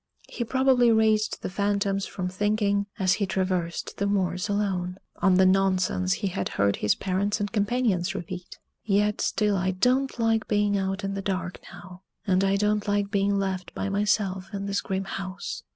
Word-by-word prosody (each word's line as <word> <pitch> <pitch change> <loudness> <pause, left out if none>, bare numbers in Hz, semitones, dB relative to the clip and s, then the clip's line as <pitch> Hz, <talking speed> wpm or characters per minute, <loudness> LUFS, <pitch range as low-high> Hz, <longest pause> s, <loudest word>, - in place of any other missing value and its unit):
He 240 - -4
probably 255 0 +3
raised 220 -1 +2
the - - -2
phantoms 200 0 0
from 180 -1 -4
thinking, 200 +1 0
as 185 -1 +3
he 200 - +1
traversed 185 -3 -2
the 200 - 0
moors 185 -1 0
alone, 190 -3 -1 0.2
on 190 -2 +3
the 190 +1 +5
nonsense 185 -1 +2
he 200 0 -2
had 100 - -3
heard 100 0 +2
his 105 - +2
parents 200 +3 -1
and 205 -1 -2
companions 210 -4 0
repeat; 180 +1 -7 0.3
yet 210 0 +1
still 210 -2 +1
I 185 0 0
don't 250 +9 +1
like 225 -1 +1
being 205 -1 +2
out 195 +1 -1
in 195 0 -2
the 195 - -3
dark 185 -2 -3
now, 180 0 -12 0.2
and 190 -1 +2
I 195 0 +2
don't 210 +1 +1
like 205 0 0
being 200 -1 +1
left 190 -2 -3
by 200 - -2
myself 195 -2 0
in 200 0 -3
this 200 0 -1
grim 190 0 -2
house. 195 0 -5
195 Hz, 180 wpm, -26 LUFS, 185-210 Hz, 0.3 s, the